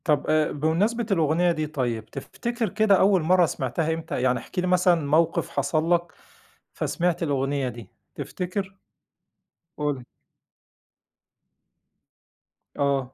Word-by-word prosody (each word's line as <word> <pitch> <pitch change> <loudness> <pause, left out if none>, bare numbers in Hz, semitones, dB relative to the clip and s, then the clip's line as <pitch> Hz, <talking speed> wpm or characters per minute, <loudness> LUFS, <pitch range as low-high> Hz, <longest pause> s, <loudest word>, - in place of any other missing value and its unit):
طَب 150 -4 +1
آآ، 155 0 +2
بمناسبة 185 +11 0
الأغنية 170 0 +2
دي 155 -2 -2
طيب، 120 -7 -2
تفتكِر 235 - -4
كده 215 +1 +3
أول 190 -2 +4
مرَّة 180 +2 +4
سمِعتها 155 +2 -1
إمتى؟ 160 -5 -4
يعني 125 -1 +2
احكِ 180 - -6
لي 180 - 0
مثلًا 180 -1 +4
موقِف 155 +3 +2
حصَل 160 +1 0
لك 175 -1 0 0.6
فسمِعت 175 0 -1
الأغنية 140 -2 0
دي، 120 -4 -10 0.3
تفتكر؟ 190 +1 -4 1.0
قُل. 145 -4 -2 2.8
آه. 135 -2 0
160 Hz, 115 wpm, -25 LUFS, 140-180 Hz, 2.8 s, أول